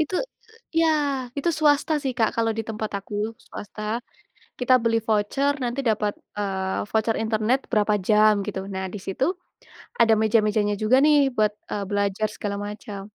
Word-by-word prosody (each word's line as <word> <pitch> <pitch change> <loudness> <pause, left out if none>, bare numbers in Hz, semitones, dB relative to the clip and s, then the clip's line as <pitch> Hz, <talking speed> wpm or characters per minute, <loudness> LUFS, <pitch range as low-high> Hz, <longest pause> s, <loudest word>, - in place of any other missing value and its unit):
Itu 310 +4 -1 0.7
ya, 330 - +4 0.5
itu 280 - 0
swasta 295 0 +3
sih 265 -3 -1
Kak, 225 - +3
kalau 225 0 +2
di - - 0
tempat 215 -1 -4
aku, 200 +1 -10 0.3
swasta. 205 +1 -8 0.8
Kita 250 +1 +4
beli 230 0 +2
voucer, 225 +7 +1
nanti 245 +3 -2
dapat, 210 -1 0 0.3
eee, 190 -2 -2
voucer 220 0 +1
internet 220 +3 +1
berapa 210 -1 +3
jam, 215 0 +6
gitu. - - -3
Nah, 190 0 -3
di - - -4
situ 195 +7 -1 0.8
ada 225 -1 +6
meja-mejanya 215 -1 +2
juga 220 +4 +4
nih, 300 0 +6 0.2
buat, 215 -1 +3 0.2
eee, 205 - -2
belajar 205 +1 0
segala 200 -1 -3
macam. 210 -1 -7
215 Hz, 155 wpm, -24 LUFS, 205-235 Hz, 0.8 s, jam